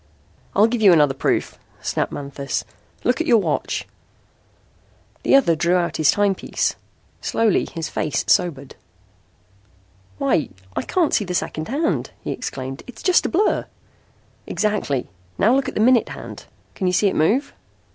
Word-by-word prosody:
"I'll 205 - +6
give 230 0 -1
you 200 -3 +7
another 150 -4 +4
proof," 135 - -1 0.2
snapped - - -2
Manthis. 140 -1 -4 0.4
"Look 250 +6 +1
at 325 - -2
your 235 - +6
watch." 205 - -1 1.3
The - - +4
other 245 -12 +4
drew 170 +3 +2
out 175 -1 0
his 155 -2 +3
timepiece. 205 -2 +1 0.5
Slowly 225 -3 +1
his 165 -2 -4
face 150 - -2
sobered. 140 -7 +1 1.4
"Why, 140 - +1 0.3
I - - 0
can't 350 -4 0
see 210 - +3
the 180 -1 -3
second 155 -2 -2
hand," 300 +7 -1
he - - -5
exclaimed. 135 0 -5
"It's 235 -3 -11
just 365 -1 +4
a - - -4
blur!" 410 +5 +1 0.8
"Exactly! 205 - -1 0.3
Now 225 +5 +4
look 275 - +1
at - - -10
the - - -1
minute 240 +1 +4
hand. - - -9 0.3
Can 190 - -2
you 180 - +1
see 205 - +2
it 190 - 0
move?" 225 - +1
195 Hz, 155 wpm, -21 LUFS, 155-240 Hz, 1.4 s, you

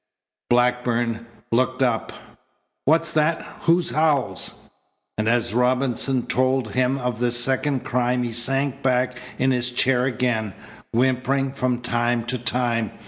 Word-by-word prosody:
Blackburn 120 -1 +1 0.2
looked 130 +2 +1
up. 120 -3 0 0.7
"What's 165 +3 +3
that? 155 +1 +1 0.2
Who's 170 +1 +3
Howells?" 155 -3 0 0.5
And 110 +1 0
as 115 -3 +1
Robinson 125 +1 +1
told 130 -3 0
him 130 +3 +1
of 125 -3 -3
the 120 0 +1
second 130 +3 +1
crime 125 0 0
he 120 - -3
sank 135 +3 -1
back 125 -1 +1 0.2
in 130 +1 +2
his 125 -1 0
chair 125 0 +2
again, 120 -6 -1 0.4
whimpering 130 +2 +1
from 125 -2 -1
time 120 0 0
to 125 +1 -3
time. 120 -2 +1
125 Hz, 130 wpm, -23 LUFS, 120-135 Hz, 0.7 s, What's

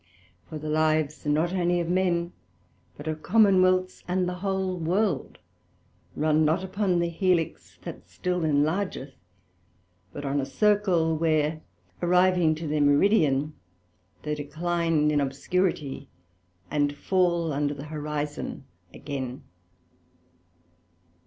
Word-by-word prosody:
For 155 - -5
the 155 +1 -7
lives, 155 -1 0
not 155 +4 +1
only 175 -1 +1
of 170 - -2
men, 175 -1 0 0.6
but 145 - -9
of 155 0 -3
Commonwealths, 185 -4 +3
and 180 0 0
the 180 - -2
whole 190 -2 -1
World, 185 +6 -1 0.8
run 155 +1 +2
not 160 +4 +1
upon 190 0 0
an 175 - +2
Helix 170 -1 -1
that 90 - -9
still 180 - -2
enlargeth; 155 -1 0 1.0
but 145 - -7
on 140 +1 0
a - - -3
Circle, 195 -6 +2
where 155 -1 +1 0.4
arriving 180 -2 +3
to 160 +1 -6
their 150 0 0
Meridian, 145 -1 +3 0.7
they 150 - -2
decline 160 +1 0
in 145 -1 +2
obscurity, 140 0 -2 0.6
and 145 -1 0
fall 170 -4 +1
under 145 +1 -1
the 140 +1 -8
Horizon 150 -2 -4 0.3
again. 130 -1 -6
160 Hz, 115 wpm, -26 LUFS, 150-180 Hz, 1.0 s, Commonwealths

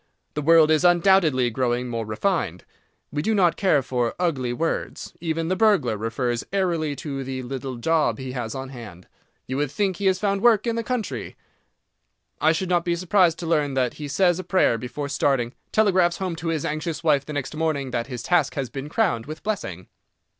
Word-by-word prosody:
The 150 - -2
world 160 +1 +6
is 155 +2 +3
undoubtedly 175 -8 +4
growing 125 0 -1
more 115 -2 -3
refined. 110 - -1 0.5
We 145 +1 -1
do 220 +7 +1
not 175 -4 +3
care 170 -8 +2
for 125 -2 -1
ugly 140 -9 0
words. 165 +7 -3
Even 165 -1 -1
the 185 - +1
burglar 190 - +3
refers 115 +2 -2
airily 170 -6 0
to 140 -2 -5
the 130 0 -5
"little 130 0 -5
job" 155 +6 +1
he 130 -1 -6
has 120 -3 -4
on 135 0 -5
hand. 110 -9 -11 0.4
You 130 - -3
would 145 -1 0
think 190 +4 -1
he 200 - 0
had 190 -1 +3
found 200 0 0
work 225 -2 +4
in 230 -1 0
the 230 - -2
country. 215 - -4 1.1
I 155 - +5
should 175 +3 -1
not 175 -1 +2
be 170 -1 0
surprised 180 -1 +3
to - - -4
learn 150 -4 +1
that 125 -2 +1
he 145 - -4
says 175 +4 +2
a - - -4
prayer 175 -10 +2
before 125 +4 -5
starting, 135 -4 0 0.2
telegraphs 185 -5 +3
home 185 -3 -3
to 165 - -5
his 160 -3 -1
anxious 155 +2 -3
wife 145 -4 +3
the 150 - -7
next 145 0 -4
morning 155 -4 -1
that 120 0 -2
his 125 -3 -6
task 165 -4 +2
has 135 -4 -3
been 140 +1 -6
crowned 165 - 0
with 155 +1 -8
blessing. 95 - -4
150 Hz, 200 wpm, -24 LUFS, 130-175 Hz, 1.1 s, world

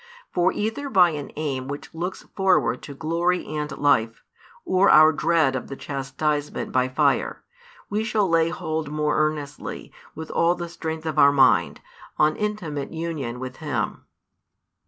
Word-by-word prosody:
For 180 +1 +3
either 225 +7 -3
by 180 -7 +5
an 145 -2 -6
aim 135 -4 -3
which 145 +1 -7
looks 175 +3 -5
forward 180 - +2
to 140 - -9
glory 170 +4 0
and 150 0 -3
life, 115 -5 +1 0.4
or 185 +2 +3
our 155 +1 +8
dread 155 -4 +2
of 130 - -4
the 135 - -6
chastisement 145 +2 -3
by 130 0 +2
fire, 130 - +1 0.4
we 210 +2 -1
shall 215 -3 +1
lay 165 -1 +3
hold 160 -3 -3
more 150 0 0
earnestly, 150 -2 -3 0.2
with 160 0 -7
all 170 +1 +2
the 175 -1 -6
strength 160 -1 -5
of 155 -1 -1
our 140 - +7
mind, 135 -3 +3 0.4
on 150 0 +3
intimate 180 -10 -3
union 155 -7 -4
with 130 0 -7
Him. 125 - -3
155 Hz, 155 wpm, -24 LUFS, 140-175 Hz, 0.4 s, our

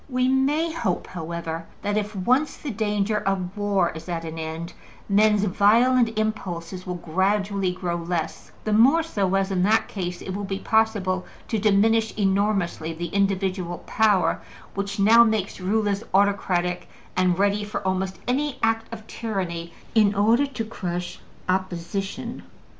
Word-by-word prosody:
We 255 -1 +1
may 290 +5 +2
hope, 195 - -1
however, 165 -1 -5 0.2
that 205 0 0
if 210 0 -2
once 255 +11 +1
the 290 - -5
danger 210 0 0
of 195 -1 -2
war 205 -4 +1
is 160 +2 -9
at 165 -1 -3
an 160 0 -6
end, 160 +2 -5 0.3
men's 210 0 +4
violent 225 +4 +3
impulses 185 -4 -3
will 180 - -2
gradually 195 +3 0
grow 180 -1 -3
less, 165 -2 -3
the 215 - 0
more 270 +10 +5
so 200 - 0
as, 195 0 +1
in 185 -2 +1
that 215 +4 +3
case, 180 -3 -4
it 190 - -5
will 205 - -3
be 195 -1 -3
possible 205 -4 +1 0.2
to 225 - 0
diminish 220 +2 +3
enormously 195 -5 0
the 170 +1 -5
individual 190 -3 0
power 210 -4 +2 0.3
which 200 0 -3
now 225 +4 +7
makes 215 -4 -1
rulers 205 +1 0
autocratic 185 -3 +1 0.3
and 180 -1 +2
ready 200 +1 +2
for 205 -1 -5
almost 190 0 -1
any 280 +3 0
act 225 0 +1
of 220 -1 -8
tyranny 180 -8 -4 0.2
in 210 -2 +4
order 225 +7 +3
to 250 -5 -4
crush 180 -5 -5 0.3
opposition. 185 +1 -3
200 Hz, 150 wpm, -24 LUFS, 180-220 Hz, 0.3 s, now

